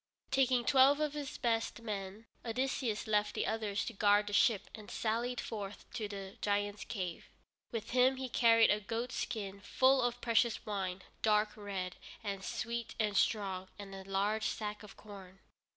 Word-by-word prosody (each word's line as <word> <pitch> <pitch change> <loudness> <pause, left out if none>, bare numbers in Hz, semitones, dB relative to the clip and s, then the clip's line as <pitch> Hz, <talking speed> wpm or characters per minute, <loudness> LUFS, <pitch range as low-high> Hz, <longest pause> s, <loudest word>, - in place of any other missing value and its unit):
Taking 255 -2 +3
twelve 275 +2 +6
of 300 -1 0
his 290 -2 -5
best 230 -2 0
men 205 0 -5 0.2
with 230 0 -4
him, - - 0
Odysseus 245 -5 -1
left 210 -1 +1
the - - 0
others 215 -2 -1
to 235 - -4
guard 205 0 +4
the 205 - -5
ship 205 0 +3
and 215 -2 -10
sallied 235 +2 -1
forth 205 -2 -5
to 225 -4 -2
the 195 -1 -7
giant's 205 0 0
cave. 180 -5 -5 0.4
With 225 -1 -4
him 255 +2 +5
he 260 0 -4
carried 230 -2 +5
a 210 - +2
goat 230 +4 -3
skin 200 -7 -3
full 260 +5 +4
of 245 0 0
precious 235 -1 +2
wine, 190 -3 -3 0.2
dark 210 -1 +3
red, 195 -3 -4 0.3
and 200 -2 -3
sweet 235 +2 -3
and 210 -2 +1
strong, 195 -3 +1
and 200 -1 -8
a 195 0 -7
large 200 +3 0
sack 210 -1 -4
of 210 -2 -12
corn. 195 -3 -11
215 Hz, 175 wpm, -34 LUFS, 200-235 Hz, 0.4 s, twelve